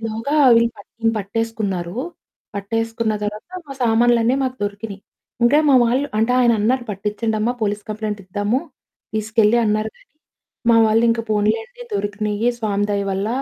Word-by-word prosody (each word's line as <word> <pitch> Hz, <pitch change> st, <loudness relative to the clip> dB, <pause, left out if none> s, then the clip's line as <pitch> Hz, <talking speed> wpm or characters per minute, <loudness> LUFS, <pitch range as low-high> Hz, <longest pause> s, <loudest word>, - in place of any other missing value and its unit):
ఇలోగా 225 Hz, +6 st, -3 dB, 0.2 s
వీళ్లు 230 Hz, 0 st, +3 dB
పట్టిం 225 Hz, +2 st, -2 dB
పట్టేసుకున్నారు. 200 Hz, -3 st, -3 dB, 0.6 s
పట్టేసుకున్న 225 Hz, +2 st, -1 dB
తర్వాత 210 Hz, +1 st, -5 dB, 0.2 s
మా -, -, -5 dB
సామాన్లన్నీ 235 Hz, +1 st, +3 dB
మాకు 255 Hz, 0 st, -3 dB
దొరికినియి. 205 Hz, 0 st, -6 dB, 0.4 s
ఇంకా 285 Hz, +5 st, +5 dB
మా 265 Hz, -, +6 dB
వాళ్లు 260 Hz, +5 st, +1 dB
అంటే, 225 Hz, +3 st, +2 dB
ఆయన 240 Hz, -1 st, +4 dB
అన్నారు, 245 Hz, +3 st, +1 dB
"పట్టించండమ్మా, 215 Hz, +3 st, -1 dB
పోలీస్ 205 Hz, 0 st, -1 dB
కంప్లెయింట్ 210 Hz, -1 st, -3 dB
ఇద్దాము, 205 Hz, +6 st, 0 dB, 0.6 s
తీసుకెళ్లి" 220 Hz, +1 st, +2 dB
అన్నారు. 215 Hz, 0 st, 0 dB
కానీ -, -, -26 dB, 0.6 s
మా 230 Hz, -, +6 dB
వాళ్లు, 220 Hz, +1 st, +3 dB
"ఇంకా 230 Hz, 0 st, 0 dB
పోనీలెండి. 445 Hz, -, -1 dB
దొరికినాయి 210 Hz, -, -1 dB
స్వామి 205 Hz, -2 st, 0 dB
దయ 200 Hz, 0 st, 0 dB
వల్ల. 195 Hz, +2 st, -1 dB
220 Hz, 140 wpm, -20 LUFS, 205-235 Hz, 0.6 s, మా